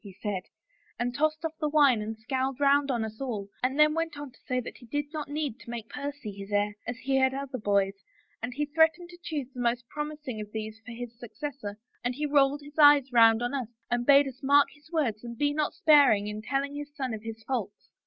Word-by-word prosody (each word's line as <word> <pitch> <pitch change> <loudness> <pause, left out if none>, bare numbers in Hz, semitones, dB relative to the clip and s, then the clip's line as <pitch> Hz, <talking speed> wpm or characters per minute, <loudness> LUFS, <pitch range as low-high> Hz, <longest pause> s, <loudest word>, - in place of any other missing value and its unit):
' - - -42
he 195 -2 -12
said, 205 -4 -2 0.6
and 245 0 -1
tossed 310 +3 0
off 320 - -2
the 305 -2 0
wine 285 -7 +5
and 220 +1 -5
scowled 260 +4 -2
round 285 0 +4
on 235 -4 0
us 220 +3 -9
all 220 -7 -3
and 260 +2 0
then 300 0 +6
went 330 -2 -2
on 290 -2 -7
to - - -24
say 255 -1 +1
that 245 - -7
he 245 - -15
did 290 +4 -1
not 300 -2 -4
need 290 -5 -3
to - - -13
make 235 -2 -5
Percy 285 -5 -5
his 195 0 -9
heir, 205 0 +1
as 245 - -3
he 270 +1 0
had 265 0 +3
other 275 -2 -4
boys, 200 -2 +2 0.5
and 235 +2 -3
he 295 +2 0
threatened 320 +3 +2
to 350 - -12
choose 305 -6 -3
the 250 - -9
most 240 0 0
promis 300 0 -5
ing 220 -4 -3
of 210 0 -8
these 220 0 -5
for 245 - -9
his 235 0 -8
successor 245 -4 -6 0.3
and 245 0 -1
he 300 +3 -2
rolled 285 0 +3
his 290 +2 -11
eyes 290 -3 +7
round 225 0 +6
on 245 - -2
us 260 -5 -2 0.2
and 240 0 +1
bade 280 0 +7
us 260 -1 -8
mark 285 +1 +5
his 290 +2 -21
words 245 -10 0
and 235 -1 -7
be 290 +2 +1
not 300 0 0
sparing 280 -10 +5
in 210 0 -5
telling 275 +5 -1
his 290 0 -6
son 260 -5 -3
of 220 - -5
his 225 0 -8
faults." 215 -6 -4
265 Hz, 245 wpm, -28 LUFS, 225-290 Hz, 0.6 s, eyes